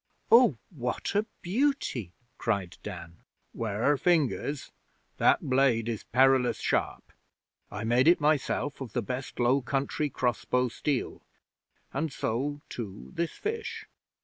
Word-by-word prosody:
'Oh, 230 - +7
what 125 -7 -3
a 210 +2 +1 0.2
beauty!' 190 - 0 0.2
cried 100 -6 -1
Dan. 85 -4 -8 0.4
''Ware 115 +6 0
fingers! 150 -4 +1 0.5
That - - +4
blade 130 -4 +3
is 115 -3 -3
perilous 130 0 +4
sharp. - - -1 0.6
I 105 - -5
made 120 +5 +3
it 175 - +6
myself 145 -1 0
of 120 -5 -6
the 120 - 0
best 130 +4 -5
Low 125 +3 +3
Country 140 +3 -1
cross 125 -5 -1
bow 125 0 +1
steel. 140 +3 -2 0.7
And 150 +2 -1
so, 140 +6 -2
too, 95 - -7
this 170 -1 -2
fish. 455 +1 -4
130 Hz, 125 wpm, -29 LUFS, 115-150 Hz, 0.7 s, Oh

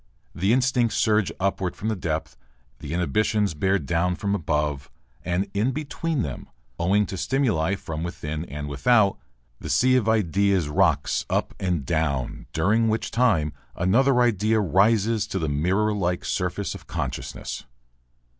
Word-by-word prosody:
The 95 +4 +1
instincts 125 -2 +2
surge 105 -3 +2
upward 95 -1 -1
from 110 - -3
the 110 - 0
depth, 80 -4 -3 0.4
the 70 - -7
inhibitions 100 +4 +1
bear 95 +6 +1
down 85 +3 0
from 100 +1 -2
above, 75 -6 -1 0.3
and 90 +3 0 0.3
between 155 - -2
them 70 -5 -6 0.3
owing 100 +5 +3
to 95 - -6
stimuli 95 - +1
from 80 -5 -6
within 80 -3 -4
and 75 0 -6
without 100 - +3 0.4
the - - -7
sea 130 0 +4
of 110 -3 +1
ideas 100 -4 +2
rocks 75 - +2
up - - -1
and 90 -7 -1
down, 70 -4 -1
during 105 +8 +2
which 110 +1 -1
time 95 -12 +2 0.2
another 125 +8 +3
idea 110 -1 +2
rises 105 +3 +2
to - - -3
the 80 -4 -1
mirror 90 +9 +1
like 90 -3 -1
surface - - -2
of - - -11
consciousness. - - -5
95 Hz, 145 wpm, -24 LUFS, 80-110 Hz, 0.4 s, sea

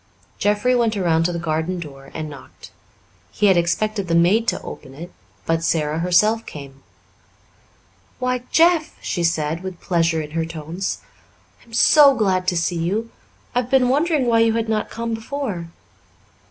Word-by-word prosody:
Jeffrey 210 +5 +2
went 230 -3 +1
around 165 -3 +2
to 175 - +1
the 170 - -3
garden 165 +2 -2
door 135 -4 -10
and 155 -1 -4
knocked. 140 -3 -13 0.6
He 210 - 0
had 195 -2 +5
expected 200 +4 0
the 165 - +1
maid 195 +7 +3
to - - 0
open 135 -2 -9
it, 170 +4 -9 0.3
put 165 0 0
Sara 155 -1 0
herself 210 +6 +3
came. 140 -2 -10 1.4
"Why, 250 -1 -1
Jeff," 330 -1 +3
she 175 - -3
said, 165 -1 0
with 185 -2 -7
pleasure 165 -2 +1
in 150 -1 -6
her 165 +1 -1
tones. 165 +3 -5 0.6
"I - - -22
am 230 - -20
so 280 +3 +6
glad 190 -5 0
to 180 -2 +1
see 170 +1 0
you. 210 +8 -2 0.4
I 245 - +2
have 245 - -9
been 255 -2 +3
wondering 295 0 +2
why 230 -1 +3
you 225 0 +3
had 225 0 -1
not 215 -1 -1
come 230 0 -4
before." 225 -6 -4
185 Hz, 170 wpm, -21 LUFS, 165-230 Hz, 1.4 s, so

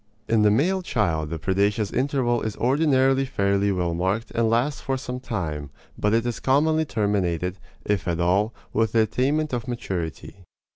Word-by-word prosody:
In 115 -1 +3
the 105 - +5
male 175 - +2
child 85 - -1
the 80 - -3
predaceous 100 +4 0
interval 130 -3 +1
is 110 -2 -4
ordinarily 135 0 +3
fairly 100 -5 +1
well 90 -3 -1
marked 95 +7 -1
and 115 -1 +1
lasts 125 +3 +1
for 135 +1 -1
some 125 -1 -5
time, 85 - -4 0.3
but 105 - 0
it 115 +1 +2
is 120 -2 -2
commonly 155 +4 +2
terminated 95 - -1 0.3
(if 105 -2 -1
at 85 -1 -1
all) 95 +6 +2 0.2
with 115 -1 +1
the 115 - +5
attainment 135 +7 0
of 120 0 -2
maturity. 90 - -5
110 Hz, 165 wpm, -24 LUFS, 95-130 Hz, 0.3 s, the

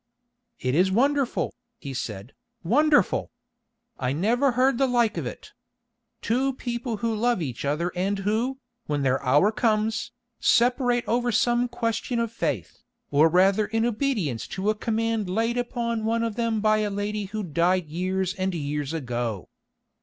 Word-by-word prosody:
"It 130 0 -1
is 185 +5 +3
wonderful," 275 +4 +1 0.2
he 140 -10 -7
said, 110 -3 -5 0.3
"wonderful! 290 - +3 0.7
I 125 0 0
never 240 - +2
heard 255 0 +2
the 270 - +3
like 240 -3 +2
of - - -3
it. - - -9 0.7
Two 265 +4 +1
people 240 -2 -4
who 230 - +1
love 235 0 +1
each 130 -8 -4
other 160 +5 0
and 195 +3 0
who, 220 +7 -1 0.3
when 145 -1 -1
their 135 0 +1
hour 145 +10 +4
comes, 220 -1 0 0.3
separate 245 0 +2
over 240 +1 +1
some 240 +3 +2
question 230 +1 -2
of 230 -1 -1
faith, 230 - -3 0.3
or 150 +3 +5
rather 195 +4 +3
in 225 +1 0
obedience 215 - -1
to 195 +2 -1
a - - -3
command 225 -2 -1
laid 225 +5 0
upon 235 -2 -2
one 230 +1 +1
of 230 -1 -1
them 230 -2 0
by 215 0 +3
a 210 -1 0
lady 205 +1 -3
who 210 +2 -4
died 175 +2 +1
years 185 +4 -2
and 190 -1 -2
years 145 -1 -3
ago. 120 - -3
215 Hz, 155 wpm, -25 LUFS, 170-235 Hz, 0.7 s, or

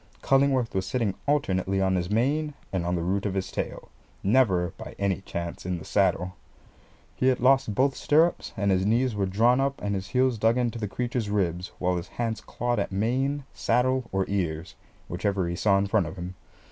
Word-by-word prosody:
Cullingworth 135 -3 +3
was 95 0 -1
sitting 115 -6 0
alternately 95 -9 +1
on 95 -1 +2
his 90 -1 -1
mane 140 +7 +1 0.2
and 90 -2 -1
on 90 - +1
the 85 - -1
root 100 +4 0
of 100 - -3
his 95 -1 -2
tail - - -5 0.3
never 95 -5 +3
by - - -9
any 100 -1 0
chance 85 -2 -5
in 90 0 -2
the 85 - -9
saddle 90 +2 +1 0.8
he 130 - +1
had 130 -1 +3
lost 130 -3 +3
both 135 +2 +2
stirrups, 160 +4 +2
and 100 0 +1
his 95 0 +2
knees 120 +4 +2
were 100 -2 0
drawn 115 +7 +3
up 140 0 -1
and 100 0 -2
his 95 -1 -3
heels 125 0 +1
dug 115 +3 +3
into 120 -2 -1
the 105 - -2
creature's 120 0 -2
ribs, 90 -3 -1
while 90 0 0
his 85 - -5
hands 115 -2 -1
clawed 120 -1 -2
at 100 - -2
mane, 130 +8 0
saddle, 130 +2 +1
or 95 0 0
ears, 85 -3 -2 0.3
whichever 95 +1 -1
he 85 - -2
saw 100 +1 +3
in 100 - +1
front 100 -3 +1
of 90 - -7
him. 90 0 -6
100 Hz, 200 wpm, -26 LUFS, 95-125 Hz, 0.8 s, Cullingworth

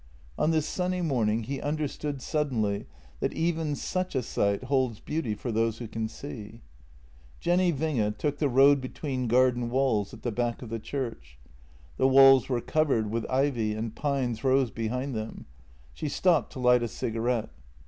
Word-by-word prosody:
On 155 - +1
this 160 -2 +2
sunny 180 +1 -1
morning 115 -7 +1
he 135 +4 -4
understood 145 -2 -3
suddenly 115 -10 -1 0.3
that - - -1
even 160 -2 0
such 185 +2 -3
a 130 - +1
sight 100 0 0
holds 130 -4 0
beauty 150 -9 -2
for 120 +3 -4
those 115 0 0
who 120 - -6
can 110 0 -3
see. 115 -2 -9 0.8
Jenny 175 0 +2
Winge 130 -9 -1
took 145 +4 -2
the 145 - +2
road 135 +2 +5
between 130 -1 -3
garden 125 0 +3
walls 120 -6 +1
at - - -12
the 120 - -1
back 120 +2 -2
of 120 - -8
the 115 0 -3
church. 115 - -5 0.6
The 130 - +4
walls 135 -1 +7
were 125 -2 0
covered 135 -10 +1
with 115 0 -2
ivy, 130 -5 +1
and 110 0 -4
pines 135 -6 -1
rose 130 -2 +3
behind 125 +4 -3
them. 110 -1 -5 0.5
She 150 - -4
stopped 170 +3 +2
to 135 - -7
light 125 -1 +4
a 120 - -1
cigarette. 115 +1 -2
130 Hz, 170 wpm, -28 LUFS, 115-145 Hz, 0.8 s, walls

